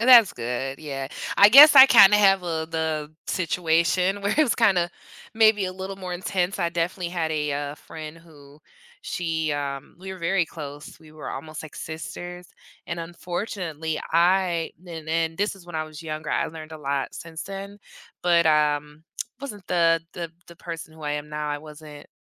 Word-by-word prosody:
And 235 Hz, -, +1 dB
that's 235 Hz, -5 st, +8 dB
good 125 Hz, +3 st, -4 dB
yeah. 135 Hz, -3 st, -5 dB, 0.3 s
I 200 Hz, -, +9 dB
guess 285 Hz, +5 st, +10 dB
I 265 Hz, 0 st, +12 dB
kinda 210 Hz, -5 st, +8 dB
have 195 Hz, -2 st, +4 dB
a 160 Hz, -2 st, -3 dB
the 160 Hz, -2 st, -2 dB
situation 180 Hz, +2 st, +1 dB
where 200 Hz, -, 0 dB
it -, -, -3 dB
was 300 Hz, -6 st, +4 dB
kinda 185 Hz, -7 st, +2 dB, 0.4 s
maybe 215 Hz, -3 st, +4 dB
a 185 Hz, -, -4 dB
little 190 Hz, +1 st, -6 dB
more 185 Hz, -2 st, -6 dB
intense, 180 Hz, +1 st, -2 dB
I 170 Hz, -, 0 dB
definitely 170 Hz, +1 st, -2 dB
had 165 Hz, -3 st, -2 dB
a, 150 Hz, -2 st, -1 dB
uh, 145 Hz, 0 st, -3 dB
friend 155 Hz, +1 st, -10 dB
who 150 Hz, -3 st, -18 dB, 0.4 s
she, 160 Hz, -, -2 dB
um, 140 Hz, -1 st, -5 dB
we 190 Hz, +1 st, -7 dB
were 190 Hz, -, -9 dB
very 170 Hz, 0 st, +1 dB
close, 145 Hz, -2 st, -9 dB
we 155 Hz, -1 st, -16 dB
were 155 Hz, -1 st, -9 dB
almost 155 Hz, +3 st, -7 dB
like 155 Hz, -, -11 dB
sisters, 175 Hz, +2 st, -7 dB, 0.4 s
and 175 Hz, -1 st, -4 dB
unfortunately, 170 Hz, -2 st, -4 dB
I 175 Hz, -1 st, +2 dB, 0.2 s
and 160 Hz, -2 st, -8 dB
and 165 Hz, 0 st, 0 dB
this 205 Hz, +1 st, 0 dB
is 180 Hz, -3 st, -17 dB
when 175 Hz, -, -11 dB
I 155 Hz, -, -1 dB
was 155 Hz, -1 st, -11 dB
younger, 155 Hz, -1 st, -5 dB
I -, -, +1 dB
learned 155 Hz, -1 st, -9 dB
a 155 Hz, -, -8 dB
lot 140 Hz, -1 st, -2 dB
since 165 Hz, -1 st, -8 dB
then. 195 Hz, +1 st, -8 dB, 0.4 s
But, 170 Hz, -2 st, +4 dB
um, 150 Hz, 0 st, +1 dB, 0.4 s
wasn't 210 Hz, -9 st, -8 dB
the 165 Hz, -2 st, +3 dB
the 170 Hz, -2 st, -6 dB, 0.2 s
the 170 Hz, -, -14 dB
person 165 Hz, -2 st, -8 dB
who 160 Hz, -, -14 dB
I 150 Hz, 0 st, -2 dB
am 150 Hz, 0 st, -4 dB
now 150 Hz, 0 st, -4 dB
I 145 Hz, 0 st, -2 dB
wasn't 150 Hz, -1 st, -12 dB
165 Hz, 185 wpm, -24 LUFS, 155-185 Hz, 0.4 s, I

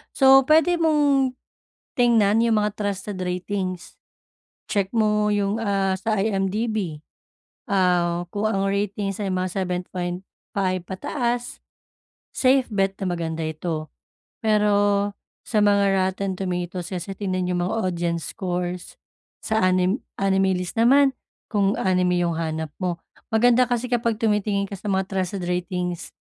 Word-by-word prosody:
So, 270 Hz, 0 st, +7 dB
puwede 320 Hz, +3 st, +5 dB
mong 290 Hz, -5 st, +3 dB, 0.7 s
tingnan 225 Hz, -3 st, +4 dB
'yung 230 Hz, -2 st, +3 dB
mga 210 Hz, 0 st, 0 dB
trusted 200 Hz, -1 st, -3 dB
ratings. 185 Hz, 0 st, -4 dB, 0.7 s
Check 195 Hz, -2 st, 0 dB
mo, 210 Hz, -1 st, +2 dB
ah, -, -, +2 dB
'yung 200 Hz, -1 st, 0 dB, 0.5 s
sa 205 Hz, +4 st, -3 dB
IMDb, 195 Hz, -4 st, -1 dB, 0.7 s
ah, 175 Hz, -2 st, +2 dB
kung 205 Hz, +1 st, -1 dB
ang 195 Hz, -2 st, 0 dB
ratings 200 Hz, 0 st, -2 dB
ay -, -, -2 dB
mga 185 Hz, 0 st, -1 dB
7.5 185 Hz, 0 st, -3 dB
pataas, 240 Hz, +5 st, -3 dB, 0.8 s
safe 260 Hz, 0 st, +3 dB
bet 195 Hz, -1 st, +1 dB
na 185 Hz, -, 0 dB
maganda 165 Hz, -2 st, -3 dB
ito, 155 Hz, -1 st, -4 dB, 0.5 s
pero 205 Hz, -2 st, +2 dB, 0.4 s
sa 215 Hz, -, +1 dB
mga 200 Hz, -1 st, +3 dB
rotten 190 Hz, 0 st, -3 dB
tomatoes 180 Hz, -1 st, -3 dB
is 175 Hz, -2 st, -4 dB
tignan 185 Hz, -3 st, -2 dB
'yung 180 Hz, -, 0 dB
mga 185 Hz, -, -2 dB, 0.2 s
audience 170 Hz, -1 st, -2 dB
scores, 180 Hz, -2 st, -4 dB, 0.5 s
sa 220 Hz, -1 st, 0 dB
anim 185 Hz, +4 st, +2 dB, 0.2 s
anime 195 Hz, -1 st, +2 dB
list 180 Hz, -1 st, -4 dB
naman, 270 Hz, +4 st, +5 dB, 0.4 s
kung 200 Hz, -1 st, +2 dB
anime 180 Hz, -1 st, +2 dB
'yung 170 Hz, -1 st, 0 dB
hanap 160 Hz, -1 st, -3 dB
mo, 180 Hz, -2 st, -1 dB, 0.4 s
maganda 245 Hz, +2 st, +4 dB
kasi 245 Hz, 0 st, -1 dB
kapag 235 Hz, -2 st, +1 dB
tumitingin 210 Hz, -2 st, +1 dB
ka -, -, -7 dB
sa 200 Hz, -, -8 dB
mga 190 Hz, 0 st, +1 dB
trusted 190 Hz, 0 st, -2 dB
ratings, 180 Hz, -1 st, -3 dB
195 Hz, 130 wpm, -23 LUFS, 180-215 Hz, 0.8 s, So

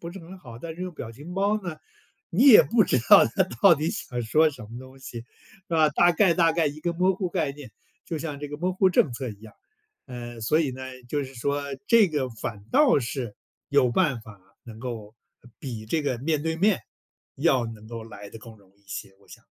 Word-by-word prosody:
不 170 Hz, -, -7 dB
是 195 Hz, -, -9 dB
很 185 Hz, +2 st, -11 dB
好， 120 Hz, -9 st, -11 dB
但 160 Hz, +5 st, -7 dB
是 175 Hz, -, -12 dB
用 185 Hz, 0 st, -4 dB
表 115 Hz, -7 st, -8 dB
情 145 Hz, +9 st, -10 dB
包 205 Hz, +2 st, +1 dB
呢， 175 Hz, -4 st, -5 dB, 0.5 s
你 245 Hz, +11 st, +5 dB
也 225 Hz, -, +10 dB
不 230 Hz, -1 st, +3 dB
知 130 Hz, -, +2 dB
道 -, -, +9 dB
他 115 Hz, -, +1 dB, 0.2 s
到 180 Hz, -5 st, +8 dB
底 155 Hz, +3 st, -1 dB
想 120 Hz, -1 st, -5 dB
说 155 Hz, +8 st, +3 dB
什 140 Hz, -7 st, -11 dB
么 105 Hz, -, -12 dB
东 130 Hz, +1 st, -13 dB
西， 125 Hz, -3 st, -8 dB
是 115 Hz, -, -15 dB, 0.4 s
吧？ 160 Hz, -2 st, +4 dB
大 175 Hz, +4 st, +4 dB
概 175 Hz, 0 st, +3 dB
大 165 Hz, -2 st, +4 dB
概 165 Hz, -1 st, +1 dB
一 145 Hz, +1 st, -4 dB
个 170 Hz, +2 st, -1 dB
模糊 185 Hz, +2 st, +1 dB
概 165 Hz, -6 st, -1 dB
念， 140 Hz, -4 st, -11 dB, 0.4 s
就 165 Hz, -2 st, -3 dB
像 150 Hz, -2 st, -5 dB
这 145 Hz, -, -5 dB
个 150 Hz, -, -6 dB
模糊 185 Hz, +3 st, +2 dB
政 150 Hz, -7 st, +3 dB
策 130 Hz, +1 st, -4 dB
一 105 Hz, -2 st, -10 dB
样。 110 Hz, -1 st, -14 dB, 0.5 s
呃， 120 Hz, -2 st, -8 dB
所 115 Hz, +8 st, +2 dB
以 150 Hz, -5 st, 0 dB
呢， 130 Hz, +1 st, -8 dB, 0.3 s
就 145 Hz, +2 st, -1 dB
是 135 Hz, 0 st, -9 dB
说 140 Hz, +4 st, -1 dB, 0.2 s
这 230 Hz, -4 st, +5 dB
个 145 Hz, -5 st, -1 dB
反 110 Hz, -2 st, -6 dB
倒 290 Hz, -, +5 dB
是 120 Hz, -2 st, -4 dB, 0.3 s
有 140 Hz, -3 st, +3 dB
办 145 Hz, -6 st, +1 dB
法 110 Hz, -3 st, -14 dB, 0.2 s
能 115 Hz, -2 st, -11 dB
够 115 Hz, -4 st, -6 dB, 0.5 s
比 115 Hz, -5 st, -6 dB
这 155 Hz, +7 st, 0 dB
个 135 Hz, -4 st, -1 dB
面 150 Hz, +3 st, -1 dB
对 160 Hz, 0 st, -1 dB
面， 195 Hz, -, +2 dB, 0.6 s
要 135 Hz, -5 st, +2 dB
能 110 Hz, -1 st, -10 dB
够 115 Hz, -1 st, -6 dB
来 100 Hz, -2 st, -11 dB
得 115 Hz, -, -10 dB
更 110 Hz, 0 st, -13 dB
容 100 Hz, -3 st, -24 dB
易 -, -, -32 dB
一 -, -, -34 dB
些， 100 Hz, +1 st, -6 dB
我 -, -, -25 dB
想。 -, -, -14 dB
145 Hz, 250 characters per minute, -25 LUFS, 115-170 Hz, 0.6 s, 也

